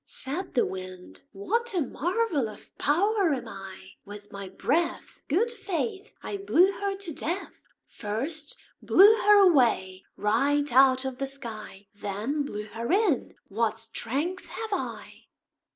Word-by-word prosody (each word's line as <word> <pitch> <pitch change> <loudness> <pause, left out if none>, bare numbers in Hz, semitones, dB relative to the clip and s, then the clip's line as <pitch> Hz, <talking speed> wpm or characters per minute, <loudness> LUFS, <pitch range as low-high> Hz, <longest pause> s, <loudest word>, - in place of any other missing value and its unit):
Said 335 +8 -4
the 245 - +4
Wind 185 -1 -8
"What 450 +4 -1
a 350 - +2
marvel 325 - 0
of 210 - -14
power 375 +1 +2
am 245 -3 -7
I! 195 -2 -10
With 205 0 -11
my 200 -1 -7
breath, 330 - -1
Good 420 - +1
faith! 400 -1 -4
I 405 - -4
blew 385 -1 +4
her 395 0 -3
to 380 -5 -6
death 345 +7 -4 0.2
First 285 +9 -4 0.2
blew 405 +4 +7
her 415 0 +6
away 225 - +2
right 275 +6 +1
out 260 0 +5
of 260 0 -4
the 275 - -1
sky 220 -7 -7
Then 205 +8 -3
blew 210 -7 -4
her 230 +3 -4
in; 385 - +1
what 220 +1 0
strength 270 +10 -3
have 445 -2 -5
I!" - - -5
275 Hz, 140 wpm, -27 LUFS, -, 0.2 s, blew